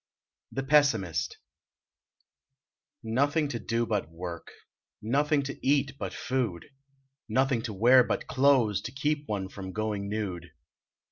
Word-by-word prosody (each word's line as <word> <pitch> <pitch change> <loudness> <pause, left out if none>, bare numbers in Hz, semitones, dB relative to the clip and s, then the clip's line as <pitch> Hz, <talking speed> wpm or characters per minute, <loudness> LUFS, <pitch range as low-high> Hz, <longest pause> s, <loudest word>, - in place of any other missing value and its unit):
THE 135 - -3
PESSIMIST 115 - +2 1.7
Nothing 145 +7 +1
to 120 - -3
do 115 +2 -1
but 105 -8 -1
work, 85 0 -7 0.5
Nothing 145 +6 +1
to 140 0 -7
eat 140 0 +2
but - - -3
food, 120 -10 -2 0.6
Nothing 130 +1 +2
to 115 - -4
wear 125 +6 +6
but - - -2
clothes 130 -8 +3
To 125 - -6
keep 145 +2 -1
one 100 -3 -2
from 95 -1 -8
going 105 -1 -2
nude. 95 -5 -4
115 Hz, 125 wpm, -28 LUFS, 100-135 Hz, 1.7 s, wear